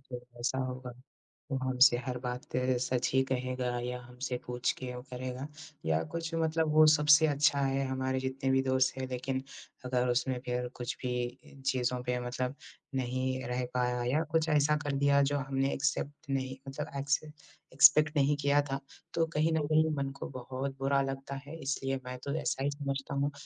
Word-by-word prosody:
जो 120 Hz, 0 st, -9 dB
ऐसा 125 Hz, +2 st, 0 dB
होगा, 130 Hz, 0 st, -6 dB, 0.6 s
वो 135 Hz, -, +1 dB
हमसे 130 Hz, -1 st, +5 dB
हर 125 Hz, -1 st, -2 dB
बात 125 Hz, 0 st, -3 dB, 0.4 s
सच 125 Hz, 0 st, 0 dB
ही 130 Hz, -, +5 dB
कहेगा 130 Hz, 0 st, -1 dB, 0.2 s
या 125 Hz, 0 st, -3 dB
हमसे 125 Hz, +1 st, -5 dB
पूछ 125 Hz, 0 st, 0 dB
के 125 Hz, -1 st, -5 dB
वो 125 Hz, -, -6 dB
करेगा 130 Hz, +2 st, -4 dB, 0.4 s
या 80 Hz, 0 st, +2 dB
कुछ 165 Hz, 0 st, -4 dB
मतलब 160 Hz, -1 st, +1 dB
वो 155 Hz, 0 st, +8 dB
सबसे 150 Hz, +1 st, +6 dB
अच्छा 140 Hz, -1 st, +3 dB
है 135 Hz, 0 st, +1 dB
हमारे 130 Hz, 0 st, -1 dB
जितने 130 Hz, 0 st, -2 dB
भी 130 Hz, 0 st, +4 dB
दोस्त 130 Hz, 0 st, +2 dB
हैं 130 Hz, -, -3 dB
लेकिन 130 Hz, +1 st, -2 dB, 0.4 s
अगर 125 Hz, 0 st, +1 dB
उसमें 125 Hz, +1 st, +1 dB
फिर 125 Hz, 0 st, -1 dB
कुछ 120 Hz, 0 st, -4 dB
भी 125 Hz, -1 st, -2 dB, 0.5 s
चीज़ों 125 Hz, -2 st, +1 dB
पे 125 Hz, 0 st, -1 dB
मतलब 125 Hz, +2 st, -2 dB, 0.4 s
नहीं 130 Hz, +1 st, -1 dB
रह 125 Hz, 0 st, -1 dB
पाया 125 Hz, -1 st, 0 dB
या 155 Hz, +3 st, +2 dB
कुछ 160 Hz, 0 st, +2 dB
ऐसा 150 Hz, 0 st, +4 dB
कर 145 Hz, -, -1 dB
दिया, 140 Hz, 0 st, +4 dB
जो 145 Hz, +1 st, +2 dB
हमने 135 Hz, 0 st, 0 dB
एक्सेप्ट 145 Hz, 0 st, -2 dB
नहीं 130 Hz, -1 st, -1 dB
मतलब 135 Hz, -, -5 dB
एक्से 145 Hz, +2 st, 0 dB, 0.5 s
एक्सपेक्ट 150 Hz, +3 st, +7 dB
नहीं 145 Hz, +1 st, +4 dB
किया 145 Hz, 0 st, +4 dB
था, 135 Hz, -1 st, -3 dB, 0.3 s
तो 165 Hz, -, +2 dB
कहीं 160 Hz, 0 st, +1 dB
न 160 Hz, -, +2 dB
कहीं 155 Hz, +1 st, +4 dB
मन 140 Hz, -1 st, -1 dB
को -, -, -4 dB
बहुत 135 Hz, +2 st, -4 dB
बुरा 135 Hz, 0 st, +2 dB
लगता 135 Hz, 0 st, -4 dB
है 145 Hz, -, -8 dB
इसलिए 135 Hz, -1 st, -1 dB
मैं 125 Hz, 0 st, -5 dB
तो 140 Hz, -, -2 dB
ऐसा 135 Hz, -, -1 dB
ही 145 Hz, -, +1 dB
समझता 140 Hz, -1 st, -4 dB
हूँ 140 Hz, +1 st, +1 dB
135 Hz, 185 wpm, -31 LUFS, 125-145 Hz, 0.6 s, वो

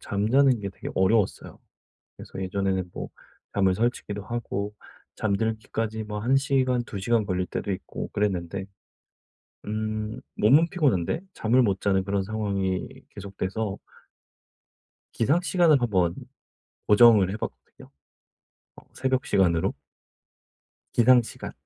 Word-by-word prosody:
잠자는 120 Hz, +5 st, +2 dB
게 100 Hz, -, -4 dB
되게 -, -, -8 dB
어려웠어요. 95 Hz, +2 st, +1 dB, 0.6 s
그래서 95 Hz, -, -8 dB
예전에는 95 Hz, -1 st, -1 dB
뭐 -, -, -6 dB, 0.5 s
잠을 95 Hz, -2 st, +3 dB
설치기도 105 Hz, -2 st, -2 dB
하고 105 Hz, -3 st, -4 dB, 0.4 s
잠들기까지 110 Hz, +1 st, -2 dB
뭐 105 Hz, 0 st, -5 dB
1 130 Hz, +5 st, +2 dB
시간 130 Hz, -3 st, +1 dB
2 100 Hz, -, -7 dB
시간 110 Hz, +1 st, +1 dB
걸릴 90 Hz, -2 st, -1 dB
때도 100 Hz, -, -4 dB
있고 95 Hz, -, -6 dB
그랬는데 95 Hz, -2 st, -2 dB, 1.0 s
음 110 Hz, 0 st, -3 dB, 0.2 s
몸은 145 Hz, +10 st, +5 dB
피곤한데 140 Hz, -, +1 dB
잠을 120 Hz, +4 st, +2 dB
못 100 Hz, -3 st, +1 dB
자는 95 Hz, -2 st, +2 dB
그런 100 Hz, 0 st, -1 dB
상황이 100 Hz, -3 st, -2 dB, 0.2 s
계속돼서 100 Hz, +1 st, -4 dB, 1.4 s
기상시간을 165 Hz, +2 st, +3 dB
한번 95 Hz, -8 st, +1 dB, 0.7 s
고정을 105 Hz, -3 st, +7 dB
해 105 Hz, -, -3 dB
봤거든요 -, -, -9 dB, 0.9 s
어 -, -, -14 dB
새벽 130 Hz, 0 st, -1 dB
시간으로. 85 Hz, -4 st, +2 dB, 1.2 s
기상 120 Hz, +1 st, +6 dB
시간. 115 Hz, -, -8 dB
105 Hz, 260 characters per minute, -26 LUFS, 95-120 Hz, 1.4 s, 고정을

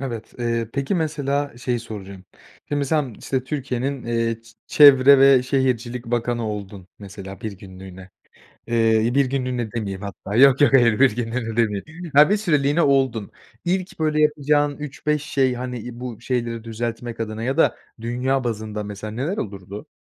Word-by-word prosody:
Evet, 115 Hz, -5 st, -6 dB
eee, 115 Hz, -2 st, -1 dB
peki, 140 Hz, +7 st, -1 dB
mesela, 145 Hz, -5 st, -2 dB
şeyi 125 Hz, -2 st, -2 dB
soracağım, 100 Hz, -4 st, -9 dB, 0.4 s
şimdi 145 Hz, -1 st, 0 dB
sen, 140 Hz, -4 st, -1 dB
işte, 130 Hz, -1 st, -2 dB
Türkiye'nin, 135 Hz, -1 st, -3 dB
eee, 115 Hz, -1 st, -1 dB
ç 115 Hz, 0 st, -19 dB
çevre 140 Hz, -2 st, +7 dB
ve 135 Hz, -2 st, +6 dB
şehircilik 125 Hz, -2 st, -1 dB
bakanı 120 Hz, -1 st, -1 dB
oldun, 100 Hz, -3 st, -7 dB
mesela, 100 Hz, -1 st, -10 dB
bir 110 Hz, -, -5 dB
günlüğüne, 95 Hz, -1 st, -12 dB, 0.6 s
eee, 115 Hz, 0 st, +2 dB
1 140 Hz, -, +4 dB
günlüğüne 125 Hz, -4 st, -2 dB
demeyeyim 100 Hz, -5 st, -4 dB
hatta. 100 Hz, +1 st, -6 dB
Yok, 135 Hz, +2 st, +6 dB
yok, 145 Hz, -, +5 dB
hayır, 120 Hz, -3 st, +5 dB
1 130 Hz, -5 st, +4 dB
günlüğüne 115 Hz, -1 st, -3 dB
demeyeyim. 145 Hz, -, -2 dB
Ya, 150 Hz, +5 st, +7 dB
bir 210 Hz, -, +3 dB
süreliğine 150 Hz, -5 st, +1 dB
oldun, 130 Hz, -7 st, +1 dB, 0.3 s
ilk 185 Hz, -1 st, -2 dB
böyle 155 Hz, -1 st, +1 dB
yapacağın 145 Hz, -1 st, +2 dB
3-5 150 Hz, 0 st, -2 dB
şey, 135 Hz, -3 st, +1 dB
hani, 125 Hz, -1 st, -5 dB
iii, 120 Hz, +2 st, -8 dB
bu 120 Hz, -3 st, -7 dB
şeyleri 120 Hz, -2 st, -2 dB
düzeltmek 115 Hz, +1 st, -5 dB
adına 110 Hz, 0 st, -4 dB
ya 135 Hz, +5 st, -1 dB
da -, -, +3 dB, 0.2 s
dünya 125 Hz, +3 st, -1 dB
bazında 110 Hz, -2 st, -4 dB
mesela, 105 Hz, +1 st, -7 dB
neler 145 Hz, -, -3 dB
olurdu? 100 Hz, 0 st, -7 dB
120 Hz, 160 wpm, -22 LUFS, 110-140 Hz, 0.6 s, çevre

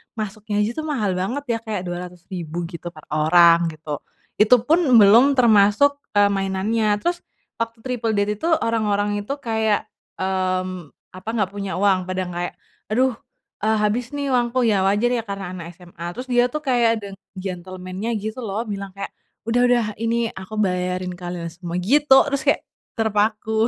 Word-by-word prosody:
masuknya 210 Hz, -1 st, -3 dB
aja 210 Hz, -, +1 dB
itu -, -, -3 dB
mahal 245 Hz, -10 st, 0 dB
banget 235 Hz, +10 st, -2 dB
ya -, -, -10 dB
kayak 220 Hz, -4 st, -4 dB
200.000 175 Hz, -1 st, -6 dB
gitu 175 Hz, 0 st, -8 dB
per 155 Hz, -, -13 dB
orang 170 Hz, +2 st, +5 dB
gitu, 155 Hz, -2 st, -6 dB, 0.4 s
itu 215 Hz, +4 st, +7 dB
pun 310 Hz, +8 st, +3 dB, 0.2 s
belum 230 Hz, +7 st, +7 dB
termasuk, 235 Hz, +3 st, +4 dB, 0.2 s
eee, 205 Hz, -1 st, +5 dB
mainannya. 200 Hz, +2 st, 0 dB
Terus 350 Hz, 0 st, 0 dB, 0.4 s
waktu 230 Hz, 0 st, -3 dB
triple 230 Hz, -3 st, -2 dB
date 205 Hz, +1 st, 0 dB
itu 325 Hz, -, -3 dB
orang-orang 205 Hz, -2 st, 0 dB
itu 240 Hz, -, -3 dB
kayak, 220 Hz, -2 st, 0 dB, 0.3 s
mmm, 185 Hz, -3 st, -2 dB, 0.2 s
apa, 185 Hz, +4 st, -9 dB
nggak 205 Hz, -5 st, 0 dB
punya 200 Hz, -1 st, -4 dB
uang 190 Hz, -1 st, +2 dB
pada 185 Hz, 0 st, -2 dB
kayak, 175 Hz, 0 st, -4 dB, 0.3 s
"Aduh, 250 Hz, +2 st, +1 dB, 0.4 s
eee, 220 Hz, +1 st, +1 dB
habis 235 Hz, +6 st, -1 dB
nih 280 Hz, -1 st, -2 dB
uangku," 245 Hz, 0 st, +1 dB
ya 215 Hz, -4 st, +3 dB
wajar 210 Hz, +5 st, +2 dB
ya 245 Hz, -, +1 dB
karena 195 Hz, -2 st, -5 dB
anak 175 Hz, -2 st, -7 dB
SMA. 175 Hz, -1 st, -11 dB
Terus 250 Hz, +2 st, -6 dB
dia 245 Hz, 0 st, +4 dB
itu 250 Hz, -, -12 dB
kayak 245 Hz, -4 st, +3 dB, 0.2 s
ada -, -, -5 dB, 0.3 s
gentlemen-nya 185 Hz, +3 st, -5 dB
gitu 220 Hz, +3 st, -4 dB
loh 220 Hz, -2 st, -3 dB
bilang 200 Hz, -3 st, -6 dB
kayak, 195 Hz, 0 st, -6 dB, 0.3 s
"Udah 230 Hz, +2 st, +1 dB
udah 245 Hz, -2 st, +3 dB
ini 230 Hz, 0 st, 0 dB
aku 190 Hz, +3 st, -9 dB
bayarin 180 Hz, -2 st, -1 dB
kalian 175 Hz, -1 st, -6 dB
semua," 170 Hz, 0 st, -7 dB
gitu 290 Hz, +9 st, +3 dB, 0.2 s
terus 280 Hz, -, +1 dB
kayak -, -, +3 dB, 0.3 s
terpaku, 220 Hz, 0 st, +1 dB
205 Hz, 165 wpm, -22 LUFS, 185-230 Hz, 0.4 s, itu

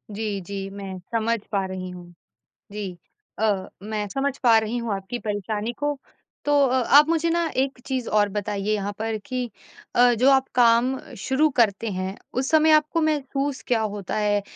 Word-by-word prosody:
जी, 210 Hz, -2 st, -2 dB
जी, 195 Hz, +1 st, -5 dB
मैं 195 Hz, -1 st, -7 dB, 0.2 s
समझ 230 Hz, 0 st, +1 dB
पा 195 Hz, -2 st, 0 dB
रही 185 Hz, -1 st, -5 dB
हूँ। 175 Hz, -1 st, -11 dB, 0.6 s
जी, 200 Hz, -4 st, -5 dB, 0.4 s
अ, 205 Hz, -4 st, +1 dB, 0.2 s
मैं 210 Hz, -1 st, -3 dB
समझ 275 Hz, +2 st, -1 dB
पा 230 Hz, -2 st, +7 dB
रही 220 Hz, +2 st, -3 dB
हूँ 230 Hz, -3 st, -2 dB
आपकी 195 Hz, +5 st, -5 dB
परेशानी 210 Hz, +1 st, -3 dB
को। 290 Hz, 0 st, -1 dB, 0.5 s
तो 290 Hz, -, +1 dB, 0.2 s
अ, 255 Hz, -, +1 dB
आप 290 Hz, +4 st, +6 dB
मुझे 335 Hz, 0 st, +2 dB
ना 340 Hz, 0 st, +1 dB
एक 265 Hz, -1 st, 0 dB
चीज़ 260 Hz, -3 st, -2 dB
और 210 Hz, -1 st, +3 dB
बताइए 205 Hz, 0 st, -2 dB
यहाँ 205 Hz, -1 st, -1 dB
पर 220 Hz, 0 st, -1 dB
कि 255 Hz, -1 st, -2 dB, 0.5 s
अ, 245 Hz, 0 st, +6 dB
जो 250 Hz, +4 st, +4 dB
आप 265 Hz, 0 st, +3 dB
काम 240 Hz, +2 st, +4 dB, 0.2 s
शुरू 270 Hz, +9 st, +2 dB
करते 220 Hz, 0 st, +2 dB
हैं, 185 Hz, +1 st, -4 dB, 0.2 s
उस 260 Hz, +1 st, -1 dB
समय 315 Hz, 0 st, +5 dB
आपको 305 Hz, +2 st, +3 dB
महसूस 285 Hz, -2 st, -1 dB
क्या 230 Hz, -3 st, +2 dB
होता 205 Hz, -3 st, -3 dB
है, 205 Hz, -1 st, +2 dB
225 Hz, 175 wpm, -24 LUFS, 200-265 Hz, 0.6 s, पा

